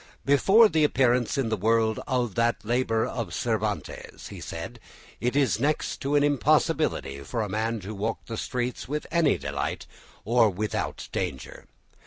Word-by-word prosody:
"Before 195 - +6
the 160 -5 +1
appearance 125 -4 +2
in 130 -4 0
the 110 - +1
world 110 +1 +1
of 125 -5 0
that 115 0 0
labour 115 -1 +1
of 110 -9 -4
Cervantes," 110 -3 -3
he - - -9
said, - - -7 0.4
"it 125 +4 -1
was 130 -8 +2
next 150 +4 0
to 140 +1 -1
an 145 - +4
impossibility 135 - +1
for 110 - -3
a - - -3
man 110 +3 -1
to 100 +4 -6
walk 110 +2 -3
the 115 - -5
streets 125 +2 -3
with 150 +3 -3
any 165 -3 +3
delight 70 0 -4 0.4
or 115 0 +4
without 105 +3 -3
danger. 70 -9 -5
115 Hz, 160 wpm, -26 LUFS, 110-135 Hz, 0.4 s, Before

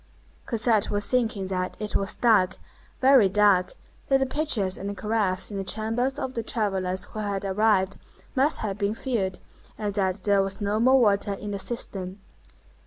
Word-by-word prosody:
Cosette 225 -3 +2
was 205 0 0
thinking 225 -6 0
that 185 -1 -3
it 210 -1 -4
was 195 - +1
dark, 205 -6 +3 0.4
very 260 -6 +6
dark, 200 -2 +3 0.3
that 270 -1 +3
the 270 - +1
pitchers 255 -9 -1
and 200 +1 -6
caraffes 210 -3 -1
in 200 - -4
the 195 - -2
chambers 225 +6 -1
of 260 - -4
the 230 - -2
travellers 190 -5 -1
who 215 - -8
had 200 -2 -3
arrived 195 -1 +1 0.4
must 275 +3 +3
have 205 -2 -3
been 205 +1 0
filled 220 -8 -2 0.4
and 205 -2 -3
that 190 -1 -1
there 200 -1 +3
was 195 0 -3
no 205 +1 -1
more 260 +3 +5
water 205 -3 +2
in 205 +1 -6
the 200 - -4
cistern. 190 -4 -3
205 Hz, 175 wpm, -25 LUFS, 195-225 Hz, 0.4 s, very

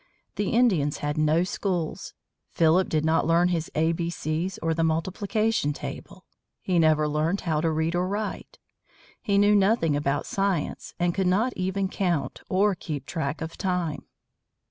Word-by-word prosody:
The 205 -2 -1
Indians 190 - +2
had 145 0 -1
no 155 +2 +2
schools. 180 -3 -3 0.3
Philip 170 +3 +3
did 155 -1 0
not 160 0 +2
learn 170 +2 +4
his 165 -3 -1
A 160 +2 +2
B 170 0 -2
C's 170 +2 -3
or 165 0 +1
the 165 0 0
multiplication 190 +2 0
table. - - -8 0.3
He 180 -2 0
never 155 -1 +3
learned 155 +6 0
how 155 -3 0
to 165 - +1
read 160 +1 0
or 180 +1 0
write. 205 +2 -4 0.6
He 200 -1 +1
knew 205 +1 +5
nothing 195 -6 +3
about 145 -1 -1
science, 195 -6 -2
and 175 0 +1
could 190 0 0
not 220 +7 +2
even 190 +1 -1
count, 180 -5 -2
or 200 +2 +3
keep 150 -6 -6
track 145 -1 -3
of 160 0 -6
time. 180 -5 -2
170 Hz, 165 wpm, -26 LUFS, 155-190 Hz, 0.6 s, knew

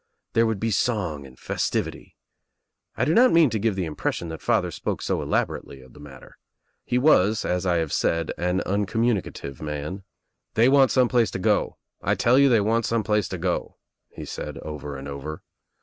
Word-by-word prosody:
There 115 0 +3
would 110 -3 -1
be 115 +2 -1
song 90 - -1
and 65 -1 -17
festivity. - - -3 0.8
I - - +1
do 155 - +2
not 250 +5 +6
mean 165 -6 +5
to 110 - -1
give 110 -1 0
the 95 -2 -1
impression 80 +2 -3
that 80 - -7
father - - +1
spoke - - -3
so - - -1
elaborately 70 - -2
of 65 -1 -17
the - - -15
matter. 70 -2 -13 0.4
He 125 - -1
was 110 -6 +3
as 90 +1 -1
I 90 - +2
have 80 -3 -1
said 85 -1 0
an 90 +2 0
uncommunicative 100 - -1
man, 75 +5 -5 0.5
"They 115 +3 +5
want 135 -1 +5
some 130 -2 +3
place 120 -2 +2
to - - -4
go. 90 - +1 0.2
I - - +1
tell 125 +3 +4
you 140 0 +6
they 115 -4 +4
want 115 +2 +1
some 115 -1 0
place 105 -1 0
J 95 - -4
go," 90 +1 -2 0.3
he - - -9
said - - -6
over 75 -2 -6
and 70 +1 -8
over. 70 +2 -7
95 Hz, 195 wpm, -24 LUFS, 80-115 Hz, 0.8 s, not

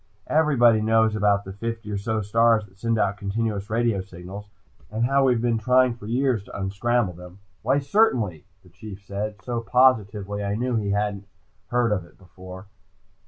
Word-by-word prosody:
"Everybody 125 -8 +4
knows 110 0 +3
about 100 -1 +2
the 95 - -7
fifty 115 +1 -5
or 100 - -2
so 110 +2 -2
stars 115 +1 +3
that 95 -1 -23
send 115 0 0
out 100 -1 0
continuous 105 0 -3
radio 115 -3 +1
signals, 95 +2 -10 0.4
and 110 +3 -1
how 135 +2 +3
we've 120 -3 +2
been 115 -2 +1
trying 125 +2 +3
for 110 -3 -11
years 125 -2 0
to - - -9
unscramble 100 +2 0
them." 90 +1 -12 0.2
"Why 130 +5 +2
certainly," 135 - +1 0.2
the 90 - -19
Chief 100 +2 -11
said, 105 +2 -5
so 120 -2 -3
positively 105 -5 +2
I 100 0 -1
knew 125 +2 -1
he 105 -3 -1
hadn't 100 0 -2 0.4
heard 120 -2 +1
of 100 -4 0
it 85 - -20
before. 95 0 -12
110 Hz, 175 wpm, -24 LUFS, 100-120 Hz, 0.4 s, Everybody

